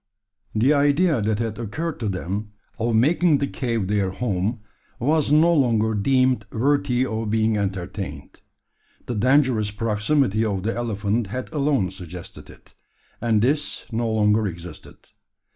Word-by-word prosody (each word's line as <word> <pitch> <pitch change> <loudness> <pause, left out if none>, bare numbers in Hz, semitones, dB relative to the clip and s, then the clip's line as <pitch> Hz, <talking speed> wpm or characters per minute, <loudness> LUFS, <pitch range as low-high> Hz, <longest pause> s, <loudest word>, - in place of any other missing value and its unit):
The 125 +7 +4
idea 145 0 +3
that 105 0 0
had 115 -1 -3
occurred 150 +9 -4
to 110 -3 -2
them 100 +3 -4 0.3
of 115 0 0
making 155 +6 +3
the 140 - 0
cave 115 -7 -2
their 100 -2 +1
home 105 +1 -2 0.4
was 145 +3 +1
no 160 +3 +5
longer 115 -7 +2
deemed 130 +1 +2
worthy 130 0 +1
of 110 -3 -3
being 110 0 +2
entertained. 95 -6 -4 0.7
The 125 - -3
dangerous 125 -1 +2
proximity 110 +2 +1
of 100 -4 -1
the 115 - -1
elephant 110 -1 -1
had 125 +9 -6
alone 140 - +1
suggested 90 -2 -10
it; - - -17 0.5
and 110 -2 +2
this 145 +4 0
no 115 0 -1
longer 105 0 +2
existed. 85 -1 -9
110 Hz, 140 wpm, -23 LUFS, 105-130 Hz, 0.7 s, no